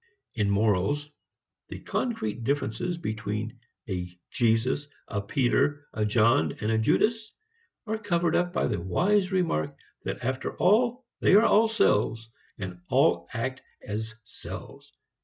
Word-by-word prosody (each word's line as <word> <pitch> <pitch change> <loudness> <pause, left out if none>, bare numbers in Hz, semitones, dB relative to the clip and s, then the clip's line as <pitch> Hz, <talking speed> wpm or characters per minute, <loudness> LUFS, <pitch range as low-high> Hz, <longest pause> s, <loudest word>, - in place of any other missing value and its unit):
In 105 -3 0
morals, 105 +8 +1 0.6
the - - -7
concrete 120 - -2
differences 140 +5 -1
between 110 -4 -4 0.3
a 90 -3 -3 0.2
Jesus, 120 +5 +1 0.2
a 100 - -2
Peter, 140 +5 +1
a 110 -1 0
John 105 - +3
and 105 +1 -2
a 110 - +2
Judas 215 - +1 0.5
are 220 0 -2
covered 175 -6 +1
up 175 0 +1
by 175 - 0
the 85 - -1
wise 185 - +2
remark 175 - 0 0.3
that - - -4
after 130 +2 -2
all 240 +6 +3
they - - +5
are 215 +3 +7
all 225 0 +5
selves 115 - +1 0.3
and 90 -2 -6
all - - +3
act - - -3 0.2
as 110 +1 -4
selves. 105 - -10
120 Hz, 135 wpm, -27 LUFS, 105-180 Hz, 0.6 s, are